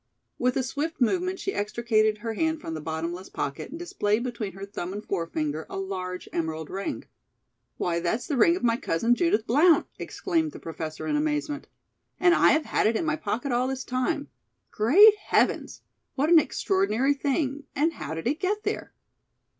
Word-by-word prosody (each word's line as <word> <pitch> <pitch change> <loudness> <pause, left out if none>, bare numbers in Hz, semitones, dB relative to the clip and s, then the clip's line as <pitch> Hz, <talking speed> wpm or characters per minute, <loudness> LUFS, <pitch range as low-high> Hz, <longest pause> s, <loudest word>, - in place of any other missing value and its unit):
With 250 0 +1
a 265 - +1
swift 290 +5 -3
movement 365 +9 +1
she 390 +1 -3
extricated 215 0 +1
her 225 +1 -4
hand 320 +7 0
from 165 - -6
the 155 - -5
bottomless 165 +4 -4
pocket 140 - -4
and 320 - -7
displayed 225 -10 0
between 235 -5 -4
her 195 +1 -7
thumb 190 -2 -5
and 205 +1 -6
forefinger 160 -4 -2
a - - -5
large 185 -2 -4
emerald 160 -2 -3
ring. 195 +1 -4 0.7
"Why, 170 -1 0
that's 220 +8 -1
the 290 - -2
ring 335 +7 +5
of 360 - -6
my 230 -1 +3
cousin, 230 +4 +1
Judith 245 -6 +1
Blount!" 305 +7 +5
exclaimed 325 -5 -1
the - - -9
Professor 160 -1 -6
in 300 - 0
amazement. 300 -1 -1 0.5
"And 350 -1 +5
I - - +5
have 310 0 +1
had - - +1
it 225 - +1
in 325 - 0
my 305 -1 +1
pocket 245 0 -3
all 245 +1 +1
this 265 -1 -3
time. 255 +4 -1 0.4
Great 400 - +7
heavens! - - 0 0.3
what 295 +4 +1
an 335 - +9
extraordinary 295 - +1
thing, 280 0 -1
and 315 +4 +2
how 155 +1 -5
did 160 - -6
it 295 +6 0
get 415 +3 -1
there?" - - -4
245 Hz, 185 wpm, -26 LUFS, 195-310 Hz, 0.7 s, an